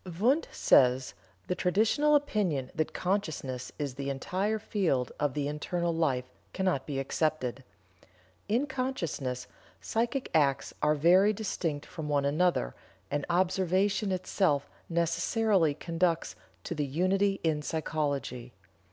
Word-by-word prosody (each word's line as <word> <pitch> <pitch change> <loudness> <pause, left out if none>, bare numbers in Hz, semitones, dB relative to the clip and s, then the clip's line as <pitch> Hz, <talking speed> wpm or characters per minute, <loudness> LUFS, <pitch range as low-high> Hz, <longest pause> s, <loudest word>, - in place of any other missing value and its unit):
Wundt 265 +9 +3
says: 130 0 +4 0.3
"The - - -1
traditional 220 +12 +3
opinion 195 - 0
that 155 - -1
consciousness 160 -9 -2
is 145 -3 -3
the 140 +1 -4
entire 185 +10 -1
field 180 - 0
of 145 -3 0
the 145 -1 -1
internal 170 +4 -1
life 140 -6 +1 0.3
cannot 185 -8 0
be 140 -3 -3
accepted. 135 -2 -1 0.9
In 240 +7 +2
consciousness, 170 - -3 0.3
psychic 240 +4 -1
acts 140 -4 +2
are 150 0 +3
very 180 +7 +5
distinct 170 -8 -3
from 155 -3 -6
one 145 -1 +2
another, 150 - +1 0.4
and 145 0 -1
observation 190 +3 +1
itself 185 -5 +1 0.2
necessarily 170 0 +2
conducts 165 +1 -1 0.3
to 150 -3 -2
unity 190 +7 +1
in 155 -2 +1
psychology. 145 -6 -3
165 Hz, 115 wpm, -30 LUFS, 140-195 Hz, 0.9 s, very